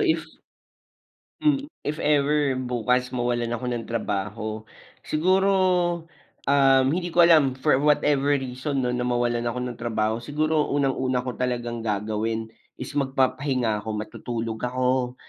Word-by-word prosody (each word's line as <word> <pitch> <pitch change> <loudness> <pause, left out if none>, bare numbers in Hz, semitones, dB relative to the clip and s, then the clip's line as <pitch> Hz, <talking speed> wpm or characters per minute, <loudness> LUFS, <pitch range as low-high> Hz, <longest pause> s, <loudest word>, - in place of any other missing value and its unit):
if 355 -6 +1 1.1
mm, 290 -1 +1 0.2
if 150 +1 -2
ever 145 -2 +2
bukas 125 0 0
mawalan 120 -1 -1
ako 120 - -5
ng 120 -1 -3
trabaho, 110 0 -3 0.4
siguro, 185 +5 +2 1.0
um, 135 -2 +5
hindi 175 +2 -2
ko 175 - +6
alam 155 -6 +5
for 130 0 +2
whatever 145 -1 +3
reason 135 +1 -2
'no, 125 - 0
na 125 0 -1
mawalan 120 -1 0
ako 120 +1 -2
ng 125 -1 -5
trabaho. 110 -1 -1
Siguro, 150 +4 0
unang-una 130 -3 0
ko 125 - -3
talagang 120 -2 -2
gagawin 110 +1 -2 0.2
is 130 - -7
magpapahinga 130 -4 0
ako, 110 +1 -5
matutulog 115 +1 -4
ako. 125 0 0
125 Hz, 130 wpm, -25 LUFS, 120-145 Hz, 1.1 s, ko